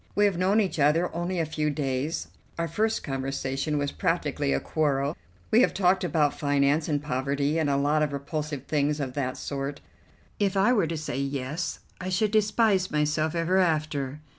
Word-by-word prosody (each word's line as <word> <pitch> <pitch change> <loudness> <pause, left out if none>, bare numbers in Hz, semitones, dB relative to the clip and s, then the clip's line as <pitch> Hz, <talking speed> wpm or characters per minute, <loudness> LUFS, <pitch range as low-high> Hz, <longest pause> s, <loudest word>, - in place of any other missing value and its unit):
We 205 - +4
have 200 -3 +2
known 190 +5 +3
each 190 -6 0
other 155 +5 +2
only 175 +2 -2
a 165 - +1
few 155 0 -1
days; 140 +1 -2 0.3
our 170 0 -1
first 220 +7 0
conversation 135 +2 -2
was 145 -1 -1
practically 70 - -1
a 70 - +2
quarrel; 140 - 0 0.4
we 225 - +6
have - - +2
talked 190 -1 +3
about 150 -4 +2
finance, 145 +2 +2
and 145 -1 0
poverty, 140 +2 0
and 155 -3 +1
a 140 - +2
lot 145 +2 +2
of 150 -1 +1
repulsive 145 0 -4
things 150 0 0
of 135 -3 -3
that 130 -2 -2
sort. 140 0 -4 0.6
If 200 -1 +1
I 205 +6 +4
were 205 -9 +2
to 165 0 -3
say, 150 -4 -3
'Yes,' 140 +4 -3 0.2
I 185 - -4
should 200 +3 +1
despise 210 -3 +2
myself 155 +1 0
ever 170 +3 +2
after. 150 -5 0
150 Hz, 185 wpm, -27 LUFS, 140-180 Hz, 0.6 s, we